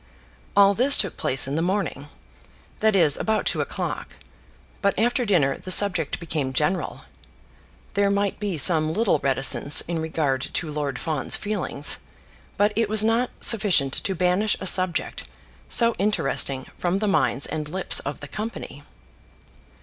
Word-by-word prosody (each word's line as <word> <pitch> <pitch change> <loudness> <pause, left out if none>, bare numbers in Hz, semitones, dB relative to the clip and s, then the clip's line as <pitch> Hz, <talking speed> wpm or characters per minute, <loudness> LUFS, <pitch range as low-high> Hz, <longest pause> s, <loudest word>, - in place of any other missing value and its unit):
All 200 0 +6
this 260 +7 +5
took 195 -5 +2
place 135 +1 -1
in 135 - -4
the 160 - -1
morning; 180 -6 -2 0.7
that 215 -1 +2
is, 160 -6 +4
about 220 -1 -1
two - - 0
o'clock; - - -5 0.7
but 200 -1 0
after 245 +4 +1
dinner 155 -10 +1
the - - -10
subject 185 -6 +2
became 150 -6 -3
general. 150 +7 -1 0.9
There 200 0 +2
might 200 0 -1
be 200 -5 -3
some 155 +1 +3
little 210 -7 +1
reticence 135 +1 +2
in 170 -1 -4
regard 155 -5 -1
to 160 -3 -3
Lord 145 -3 -3
Fawn's 155 -2 -1
feelings, 190 -8 -2 0.6
but 205 +1 +2
it 225 -1 0
was 215 0 +3
not 230 +3 +1
sufficient 190 - +3
to 190 - -2
banish 180 +4 +1
a - - -6
subject 185 -1 0 0.4
so 235 -1 +3
interesting 135 -9 0
from 180 +1 0
the 210 +1 -2
minds 140 -8 +1
and 155 -1 -5
lips 185 +3 +2
of 145 +1 -6
the 145 - -8
company. 215 +8 -7
180 Hz, 150 wpm, -23 LUFS, 150-205 Hz, 0.9 s, All